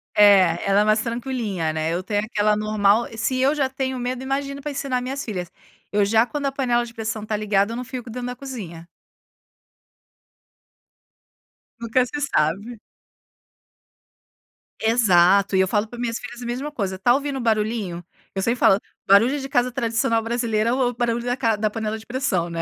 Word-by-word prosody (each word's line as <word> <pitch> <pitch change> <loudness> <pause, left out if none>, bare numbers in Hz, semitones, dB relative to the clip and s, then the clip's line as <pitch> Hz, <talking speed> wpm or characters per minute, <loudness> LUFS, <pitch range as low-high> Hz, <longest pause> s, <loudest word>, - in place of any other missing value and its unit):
É, 190 -5 +5
ela 200 +1 +4
é - - +4
mais 215 +1 +3
tranquilinha, 230 -9 -2
né, 160 +1 -1
eu 175 - -1
tenho 205 +1 0
aquela 210 -1 +1
normal, 215 +1 +2
se 255 +4 0
eu 270 +3 +3
já 280 -3 0
tenho 265 -1 -3
medo, 250 +1 -3
imagino 275 +1 -3
para 295 0 -4
ensinar 265 -2 -2
minhas 270 +2 -4
filhas. 180 -6 -5 0.4
Eu 205 0 +2
já 220 +3 +3
quando 285 +3 -4
a - - -1
panela 245 -3 +1
de 230 - -12
pressão 220 -1 -4
está 215 0 -2
ligada, 205 0 +1
eu 230 - -4
não 250 - -4
fico 250 -1 -7
dentro 245 +2 -5
da 250 - -5
cozinha. 200 -12 -8 2.9
Nunca 235 +2 +1
se 290 +4 -5
sabe. 205 - -1 2.0
Exato, 200 -4 +4
e 190 - +4
eu 190 - +3
falo 210 +2 0
para 240 - -11
minhas 235 -1 -2
filhas 240 0 -9
a - - -6
mesma 255 +5 -4
coisa: 200 -9 -3
"Está 195 +6 +3
ouvindo 280 0 -2
o - - -3
barulhinho?". 215 -5 -1 0.3
Eu 195 - -1
sempre 235 +3 0
falo: 195 - +5 0.3
"Barulho 230 +9 +5
de 270 0 -6
casa 250 -3 +1
tradicional 230 -1 0
brasileira 230 -1 0
é - - +2
o 255 -1 +2
o - - -5
barulho 235 0 -1
da 245 0 0
ca 230 -4 +1
da 215 +1 0
panela 220 0 -3
de 220 - -13
pressão, 235 -9 -1
né". 165 0 -3
230 Hz, 190 wpm, -22 LUFS, 205-250 Hz, 2.9 s, É